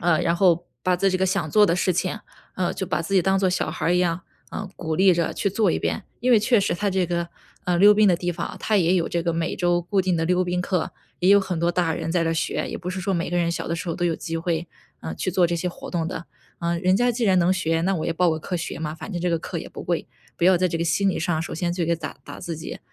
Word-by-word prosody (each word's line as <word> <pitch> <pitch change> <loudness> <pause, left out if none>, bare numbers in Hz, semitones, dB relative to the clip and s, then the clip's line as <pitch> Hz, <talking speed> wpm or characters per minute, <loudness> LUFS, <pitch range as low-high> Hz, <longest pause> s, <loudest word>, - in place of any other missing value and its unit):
嗯， 170 -2 +2
然 170 +1 +1
后 175 -2 +3 0.2
把 185 - +3
在 195 +2 +2
这 185 - 0
个 190 - +2
想 165 -4 -1
做 210 +2 +5
的 170 - +2
事 180 +1 +1
情， 185 +5 -2 0.3
啊， 180 -2 -1
就 190 - -4
把 165 - -1
自 195 - -6
己 190 - +5
当 190 +2 +2
做 190 -1 +2
小 180 - -1
孩 - - -3
儿 175 - +3
一 180 - +3
样， 175 -1 +1 0.3
嗯， 205 -2 -5
鼓 160 -2 -3
励 190 +2 +5
着 170 -1 0
去 200 - 0
做 200 -1 +2
一 - - -1
遍。 210 - -2 0.2
因 250 +2 +1
为 235 - +7
确 215 +1 +3
实 195 - 0
它 205 +4 -1
这 190 -1 +1
个， 170 0 -2 0.4
啊， 180 - +1
溜 205 +4 +7
冰 210 0 +4
的 185 - +5
地 175 +1 -2
方 170 0 -3
啊， - - -8
它 215 - +1
也 180 -2 +3
有 175 -3 +1
这 170 - -1
个 170 0 -1
每 165 0 -2
周 175 -1 +1
固 195 +3 +1
定 185 -2 +1
的 165 - 0
溜 180 +1 +2
冰 180 0 -1
课， 180 -2 -1 0.3
也 180 - +2
有 200 0 +7
很 185 -3 -3
多 170 +1 +1
大 170 -2 +1
人 165 - -3
在 175 -2 +2
这 165 - 0
儿 - - +1
学， 165 - -1
也 - - -5
不 180 - -6
是 185 +1 -3
说 195 +1 -1
每 170 0 -1
个 175 - 0
人 170 -1 +1
小 170 - -3
的 170 - -1
时 180 +1 -5
候 165 - -2
都 175 - -1
有 170 - +1
机 165 +1 -4
会， 165 0 -2 0.3
啊， 80 0 -5
去 130 - -4
做 180 0 +3
这 170 0 +1
些 180 +2 -2
活 - - -9
动 165 -3 -1
的。 170 -1 -5 0.3
嗯， 170 0 -1
人 185 +1 +3
家 245 +2 +3
既 235 0 -1
然 190 -2 +4
能 175 +2 +3
学， 165 -3 0
那 190 +2 +1
我 155 - -3
也 165 - 0
报 175 0 +2
个 160 - -1
课 180 +3 -4
学 170 - -5
嘛， 155 -1 -4
反 175 +6 -8
正 175 - -3
这 180 - 0
个 165 -1 0
课 - - -5
也 - - -7
不 - - -9
贵， - - -2 0.3
不 - - 0
要 185 0 +6
在 185 +1 +1
这 165 - -2
个 170 - 0
心 195 +4 +2
理 190 - 0
上 165 -2 0
首 - - -6
先 175 +1 -1
就 175 -2 -1
给 170 0 +1
打 160 - -7
打 - - -9
自 165 -2 -5
己， 160 - -7
175 Hz, 345 characters per minute, -24 LUFS, 170-190 Hz, 0.4 s, 为